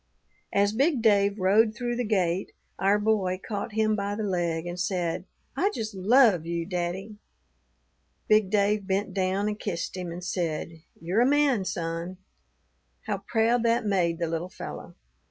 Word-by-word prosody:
"As 200 +1 +2
big 270 0 +1
Dave 200 -2 +3
rode 215 +4 +3
through 240 0 -2
the 245 - -1
gate, 190 -4 0 0.3
our 200 +2 +3
boy 205 -4 +1
caught 210 +1 -4
him 215 0 +2
by 200 0 -2
the 215 - -3
leg 175 -4 -1
and 175 +1 -5
said, 180 -2 -1 0.3
'I 400 - +2
just 215 -1 -4
love 205 - +4
you, 170 0 -3
daddy.' 185 +3 -4 1.1
Big 215 -2 +4
Dave 205 0 +1
bent 195 +1 -1
down 190 +1 0
and 210 0 -3
kissed 170 +2 -3
him, 180 -2 -5
and 175 +1 -7
said, 165 -2 -3 0.2
'You're 180 +7 +1
a 245 - +4
man, 280 -8 +3
son.' 170 +1 -4 0.9
How - - -2
proud 230 +1 +1
that 230 -1 +1
made 180 -5 +1
the 170 - -1
little 165 +2 -3
fellow! - - -8
200 Hz, 160 wpm, -27 LUFS, 175-215 Hz, 1.1 s, love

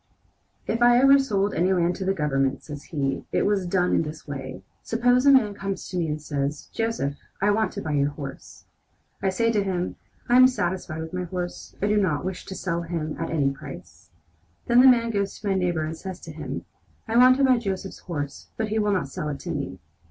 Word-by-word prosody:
"If 230 +2 -1
I 240 0 +6
ever 275 +2 +7
sold 205 -6 0
any 180 +4 +2
land 175 -1 +1
to 190 - -4
the 190 - +2
Government," 135 -4 0
says 145 -1 -8
he, 140 -3 -2
"it - - +1
was 200 -3 +1
done 180 0 +1
in - - +3
this 155 -1 -7
way: 135 -2 -6 0.2
Suppose 245 +3 +2
a - - +9
man 230 -7 +5
comes 195 -1 -4
to 180 - -4
me 170 -2 0
and 150 0 -2
says: 145 -1 -3
'Joseph, 225 -12 -1 0.3
I 205 +1 +3
want 220 +1 +1
to 200 - -5
buy 155 - -3
your 145 -1 +2
horse.' 145 -2 -9 0.6
I 195 - +2
say 230 +5 +1
to 210 -3 +1
him: 185 -2 -2 0.3
'I 240 - +3
am 255 0 +9
satisfied 175 -9 -2
with 160 +1 -7
my 180 0 -2
horse. 175 0 -6
I - - +3
do 210 0 +2
not 175 -6 +1
wish 185 -1 -5
to 190 - -6
sell 170 -3 -2
him 165 -2 -3
at - - -2
any 145 -4 +1
price.' 135 - -11 0.6
Then 240 +1 +6
the 265 - +8
man 235 -2 +5
goes 200 -2 -2
to 210 - -6
my 195 - +2
neighbor 175 -4 0
and 160 +1 -4
says 185 +2 -7
to - - -9
him: - - -6 0.4
'I 225 +1 +1
want 255 +1 +7
to 275 - +2
buy 255 -2 +5
Joseph's 195 -3 -4
horse, 145 -5 -5
but 220 -1 -1
he 220 +1 0
would 210 -1 +2
not 180 -8 0
sell 150 +2 -4
it 140 - -4
to 175 - -5
me.' 140 - -4
185 Hz, 230 wpm, -25 LUFS, 155-215 Hz, 0.6 s, a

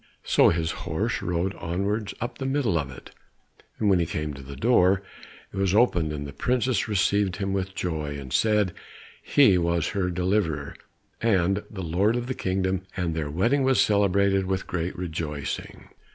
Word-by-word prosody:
So - - +5
his 80 -1 0
horse - - -2
rode 90 +2 -1
onwards 100 +5 -2
up 120 - -5
the 135 - -2
middle 135 - +1
of 70 -3 -4
it, 65 - -12 0.7
and 110 - 0
when 95 -3 +4
he 85 - 0
came 75 -2 -3
to 70 - -9
the 70 +1 -9
door, 100 - +3 0.5
it - - -7
was 95 0 +1
opened 90 -9 +3
and 75 -1 -4
the 70 - -8
princess 125 - 0
received 100 -2 +1
him 100 -1 -2
with 95 0 -2
joy, 75 -6 -3
and 65 -2 -8
said 105 -4 +2 0.5
he 100 -11 +5
was 85 -1 0
her 95 -3 -1
deliverer, 90 -5 -1 0.5
and 95 -3 +2
lord 95 +3 0
of 120 0 -2
the 130 - -2
kingdom, 95 -3 -1 0.2
and 90 -3 -1
their 80 -2 -3
wedding 115 - +2
was 130 -1 +3
celebrated 100 -1 +3
with 95 0 -1
great 85 -1 -3
rejoicing. 80 -5 -5
95 Hz, 170 wpm, -26 LUFS, 85-105 Hz, 0.7 s, So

